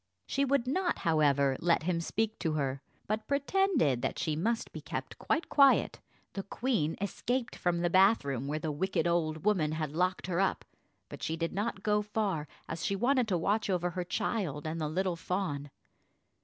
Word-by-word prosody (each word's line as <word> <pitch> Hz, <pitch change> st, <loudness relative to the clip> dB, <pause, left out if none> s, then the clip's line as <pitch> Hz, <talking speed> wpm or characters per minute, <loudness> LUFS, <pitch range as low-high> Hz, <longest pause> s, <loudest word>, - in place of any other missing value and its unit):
She 280 Hz, -, 0 dB
would 275 Hz, -2 st, +2 dB
not, 345 Hz, +7 st, 0 dB
however, 140 Hz, -4 st, +3 dB
let 170 Hz, -2 st, +2 dB
him 170 Hz, 0 st, 0 dB
speak 220 Hz, +5 st, -1 dB
to 160 Hz, -3 st, 0 dB
her, 135 Hz, -3 st, -1 dB, 0.2 s
but 215 Hz, +1 st, -2 dB
pretended 280 Hz, -, +2 dB
that -, -, -2 dB
she 155 Hz, -, -1 dB
must 225 Hz, +9 st, -1 dB
be -, -, -6 dB
kept -, -, -6 dB
quite 325 Hz, -, 0 dB
quiet. 275 Hz, -2 st, +4 dB, 0.3 s
The 195 Hz, -, -3 dB
queen 200 Hz, -, -1 dB
escaped 240 Hz, +5 st, -2 dB
from 175 Hz, -1 st, 0 dB
the 175 Hz, -, +2 dB
bath 190 Hz, -1 st, +5 dB
room, 135 Hz, -1 st, -2 dB
where 150 Hz, +2 st, -1 dB
the 155 Hz, 0 st, -2 dB
wicked 185 Hz, +6 st, 0 dB
old 165 Hz, -1 st, 0 dB
woman 170 Hz, -8 st, +2 dB
had 155 Hz, -2 st, -2 dB
locked 180 Hz, +4 st, 0 dB
her 175 Hz, -1 st, -1 dB
up, 195 Hz, -1 st, +1 dB, 0.4 s
but -, -, -10 dB
she 160 Hz, -, -2 dB
did 165 Hz, 0 st, -2 dB
not 205 Hz, 0 st, -2 dB
go 210 Hz, 0 st, +2 dB
far, 205 Hz, -7 st, -2 dB, 0.2 s
as 165 Hz, 0 st, -5 dB
she 200 Hz, -, 0 dB
wanted 250 Hz, +3 st, +2 dB
to 185 Hz, -4 st, +1 dB
watch 205 Hz, +6 st, 0 dB
over 180 Hz, -1 st, 0 dB
her 180 Hz, +1 st, -3 dB
child 175 Hz, -, -2 dB
and 160 Hz, +1 st, -3 dB
the 150 Hz, -, -1 dB
little 185 Hz, +2 st, 0 dB
fawn. 165 Hz, -5 st, -3 dB
180 Hz, 190 wpm, -31 LUFS, 155-215 Hz, 0.4 s, bath